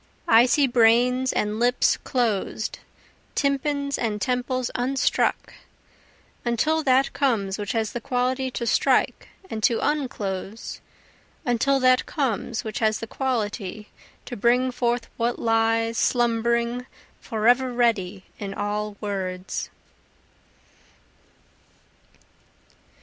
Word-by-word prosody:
I 230 +2 +6
see 285 +2 +4
brains 250 +1 +3
and 210 +1 -1
lips 245 +1 +3
closed, 220 -3 -2 0.6
tympans 280 0 0
and 215 -3 -1
temples 250 +3 -1
unstruck, 260 +2 0 0.9
Until 305 +7 +1
that 265 -1 +3
comes 215 -8 0
which 205 -2 -3
has 220 -2 -1
the 240 - -5
quality 260 +1 0
to 240 -1 -4
strike 230 - +2 0.2
and 220 -10 -5
to 230 +1 +3
unclose, 220 -8 -3 0.6
Until 260 +3 +2
that 255 0 +4
comes 255 - -2
which 220 - -4
has 215 -1 +2
the - - -5
quality 215 -5 -3 0.4
to 245 - -6
bring 245 +4 +2
forth 240 -1 -1
what 235 +1 0
lies 225 0 +1
slumbering 235 +1 +1 0.3
forever 245 +3 +2
ready 210 -6 0 0.2
in 195 -2 -5
all 210 0 -3
words. 190 -3 -4
235 Hz, 105 wpm, -24 LUFS, 215-255 Hz, 0.9 s, I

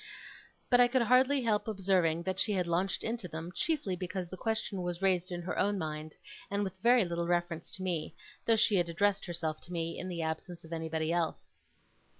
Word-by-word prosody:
But 245 - +6
I 245 - +7
could 250 0 +2
hardly 255 +3 +4
help 215 -2 +1
observing 185 -5 +2
that 190 +1 -2
she 210 - +1
had 185 -2 +1
launched 175 +3 0
into 225 -4 -2
them, 165 +1 -6
chiefly 240 - 0
because 180 0 -4
the 185 - -6
question 220 -1 -2
was 175 -1 -3
raised 185 -2 +1
in 175 -1 -4
her 175 - -3
own 205 +1 +2
mind, 155 -2 -4 0.3
and 200 +1 0
with 190 -1 -4
very 240 -1 +5
little 170 0 -2
reference 175 -1 -1
to 190 - -6
me, 175 -4 -2 0.3
though 225 - +6
she 210 -2 +4
had 175 -1 +1
addressed 200 +4 +1
herself 160 -3 -2
to 175 - -10
me 165 -1 -3
in 185 - -4
the 170 -2 -3
absence 160 +2 -4
of 165 +1 -9
anybody 160 0 -1
else. 170 -2 -2
180 Hz, 205 wpm, -32 LUFS, 170-205 Hz, 0.3 s, I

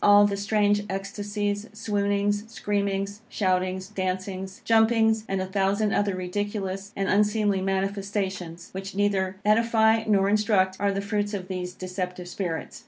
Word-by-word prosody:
All 205 0 +7
the 205 -1 0
strange 205 0 +2
extacies, 205 +2 -3
swoonings, 205 0 0
screamings, 200 -2 -2
shoutings, 185 -2 0
dancings, 190 0 -4
jumpings, 225 -1 +3
and 195 0 0
a 185 - -1
thousand 200 +2 +1
other 200 -2 +1
ridiculous 195 +1 -3
and 195 0 -1
unseemly 205 -1 +2
manifestations, 195 -3 -2
which 195 +1 -6
neither 200 -2 +1
edify 220 0 +4
nor 195 -2 +3
instruct, 200 -2 +2
are 200 0 +2
the 195 0 -2
fruits 205 0 -1
of 185 -1 -6
these 180 -1 -4
deceptive 180 -1 -5
spirits. 175 -2 -4
200 Hz, 135 wpm, -26 LUFS, 190-205 Hz, -, All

